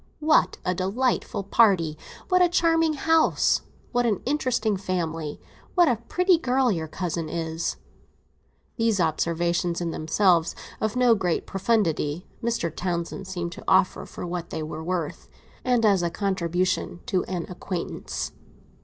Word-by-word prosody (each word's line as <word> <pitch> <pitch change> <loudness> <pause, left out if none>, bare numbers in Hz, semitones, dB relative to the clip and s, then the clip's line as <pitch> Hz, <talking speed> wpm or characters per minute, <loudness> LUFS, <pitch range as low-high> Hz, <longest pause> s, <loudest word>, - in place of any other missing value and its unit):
"What 310 0 +3
a 180 - +1
delightful 195 +3 -1
party! 190 -7 +3 0.3
What 365 -1 +4
a 355 - +5
charming 330 -2 +3
house! 320 +2 +3 0.3
What 245 -1 +2
an 210 -4 +1
interesting 250 -6 +1
family! 165 -5 -3 0.4
What 350 -2 +6
a 245 -5 +2
pretty 355 - +2
girl 255 -3 +2
your 165 -4 -2
cousin 165 -1 -3
is!" 165 0 -2 1.0
These 225 -4 +2
observations, 170 +1 0
in 170 -1 -2
themselves 170 +1 +2 0.2
of 220 +1 -1
no 250 -2 +5
great 180 -6 0
profundity, 180 -6 0 0.2
Mr. 230 -9 -1
Townsend 175 +2 -3
seemed 175 -2 -4
to - - -10
offer 190 0 +3
for - - -7
what 175 -1 -4
they 155 - -4
were 155 +1 -6
worth, 170 -3 -3 0.3
and 245 -3 +2
as 200 -4 +4
a 170 - 0
contribution 180 -1 -1
to 185 - 0
an 180 -3 -3
acquaintance. 180 -1 -4
185 Hz, 140 wpm, -25 LUFS, 170-235 Hz, 1.0 s, What